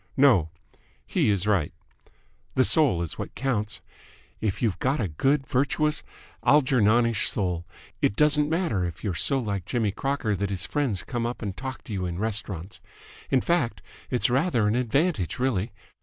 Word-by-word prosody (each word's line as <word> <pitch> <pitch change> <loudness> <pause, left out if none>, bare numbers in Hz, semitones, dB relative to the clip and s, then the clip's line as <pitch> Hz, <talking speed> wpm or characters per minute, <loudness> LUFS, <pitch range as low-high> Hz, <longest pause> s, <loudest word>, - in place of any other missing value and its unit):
no, 120 - +5 0.6
'he' - - +1
is 100 -2 +1
right. 100 -8 +1 0.8
The 130 - +4
soul 135 - +3
is 85 - -7
what - - -6
counts. 110 -5 -1 0.6
If 105 -3 -1
you've 110 -6 0
got 135 +3 0
a 105 - 0
good, 135 - +1
virtuous, 145 +3 +1 0.4
Algernonish 120 -5 +3
soul, 90 -4 -2 0.3
it 100 - +2
doesn't 150 +2 +4
matter 160 - 0
if 85 -2 -5
you're 100 -4 -1
so 135 +10 +3
like 100 -8 -3
Jimmy 110 -4 0
Crocker 130 -2 -1
that 100 +1 -2
his 95 -2 -1
friends 130 -11 0
come 120 -2 -2
up 120 0 -5
and 100 -3 -4
talk 130 +1 -6
to 110 - -7
you 95 -2 -2
in 85 -1 -4
restaurants. 100 -4 -2 0.5
In 130 - +3
fact, 160 -9 0 0.3
it's 125 - +2
rather 125 -4 +2
an 105 - +1
advantage, 125 - 0
really. 120 -4 0
115 Hz, 165 wpm, -26 LUFS, 100-135 Hz, 0.8 s, no